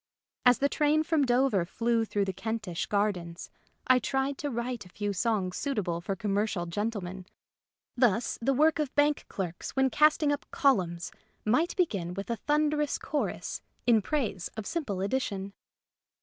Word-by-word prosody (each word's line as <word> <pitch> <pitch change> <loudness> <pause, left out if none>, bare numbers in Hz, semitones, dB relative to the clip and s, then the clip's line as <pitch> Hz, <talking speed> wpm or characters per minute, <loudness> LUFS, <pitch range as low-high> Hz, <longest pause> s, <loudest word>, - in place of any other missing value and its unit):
As 245 -2 +7
the 280 - +2
train 300 +2 +2
from 315 -3 +2
Dover 245 -6 +3
flew 230 +5 0
through 205 -2 0
the 190 - -2
Kentish 215 -6 -3
gardens, 185 -5 -1 0.3
I 255 -1 +5
tried 270 +3 -1
to 290 - -2
write 240 -1 -3
a 180 - -15
few 205 +2 -3
songs 195 -2 0
suitable 200 - -1
for 195 +2 -2
commercial 205 -1 -1
gentlemen. 190 -1 -4 0.7
Thus, 240 -2 +2
the 270 +3 +2
work 310 +3 +4
of 295 -4 -2
bank 290 0 +2
clerks 180 +1 -5
when 265 -1 +3
casting 300 0 +4
up 290 +1 -3
columns 180 -10 +1 0.3
might 280 +11 +2
begin 195 - 0
with 195 +4 -4
a 230 - -1
thundering 300 +4 +1
chorus 295 0 -3 0.2
in 230 -3 +5
praise 215 - -2
of 220 - -4
Simple 220 - -2
Addition. 200 -3 -2
230 Hz, 155 wpm, -29 LUFS, 195-280 Hz, 0.7 s, As